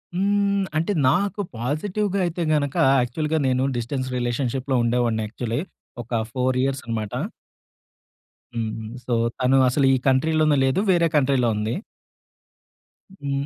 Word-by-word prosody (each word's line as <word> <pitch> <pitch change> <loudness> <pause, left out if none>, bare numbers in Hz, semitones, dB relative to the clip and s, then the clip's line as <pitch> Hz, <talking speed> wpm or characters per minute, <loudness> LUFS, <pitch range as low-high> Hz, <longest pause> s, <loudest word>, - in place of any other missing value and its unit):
హ్మ్. 200 +1 +1
అంటే 165 +6 0 0.2
నాకు 200 +5 0 0.2
పాజిటివ్‌గా 190 - -1
అయితే, 175 0 -3
గనకా 145 -2 +1 0.2
యాక్చువల్‌గా 150 +6 -1
నేను 130 0 +1
డిస్టెన్స్ 130 +2 -3
రిలేషన్‌షిప్‌లో 125 +2 -1
ఉండేవాడిని 120 -2 +1
యాక్చువల్లీ. 115 +3 -3 0.4
ఒక 115 -1 -1
4 130 0 0
ఇయర్స్ 135 0 -1
అన్నమాట. 110 -2 -3 1.4
హ్మ్. 110 -1 -4 0.2
సో 125 - -1 0.3
తను 130 +1 +3
అసలూ 135 +2 +2
ఈ - - +2
కంట్రీలోనే 155 +3 +3
లేదు. 135 +6 +1
వేరే 170 -2 +3
కంట్రీలో 130 -4 +3
ఉంది. 105 +2 -1 1.4
హ్మ్. 140 -6 -3
135 Hz, 120 wpm, -23 LUFS, 120-160 Hz, 1.4 s, తను